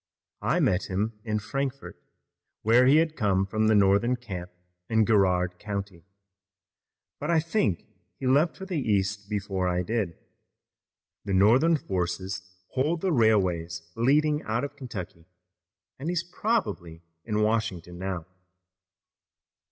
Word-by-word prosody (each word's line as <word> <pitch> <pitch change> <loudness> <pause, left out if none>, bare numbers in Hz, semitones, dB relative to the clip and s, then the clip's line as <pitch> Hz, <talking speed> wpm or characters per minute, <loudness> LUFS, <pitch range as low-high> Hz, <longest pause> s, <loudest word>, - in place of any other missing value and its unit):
I - - +1
met 90 +1 +2
him 105 +3 -2
in 110 -2 -1
Frankfort, 135 +6 -4 0.7
where 120 +4 +5
he 140 - +6
had 160 0 +3
come 95 -5 +1
from 110 +3 0
the 110 - +4
Northern 100 +5 +4
camp 95 -7 -7 0.4
in 110 -1 +3
Garrard 90 -4 +2
County, 100 -4 -5 1.1
but 150 - -4
I 170 -1 +4
think 155 - 0 0.3
he - - -6
left 145 +6 +3
for 190 - -7
the 180 -5 -2
East 100 -3 0
before 95 -3 -1
I 90 0 0
did. 100 -4 -2 1.1
The 100 -2 0
Northern 125 - +5
forces 95 - -3 0.3
hold 155 +6 0
the 190 - +1
railways 90 - +1
leading 150 +6 +3
out 115 +3 -2
of 140 0 -5
Kentucky 100 - -8 0.7
and 145 +5 -3
he's 175 -1 0
probably 175 - -2 0.2
in 105 -1 0
Washington 100 -6 -1
now." 95 -3 -3
105 Hz, 130 wpm, -27 LUFS, 95-135 Hz, 1.1 s, he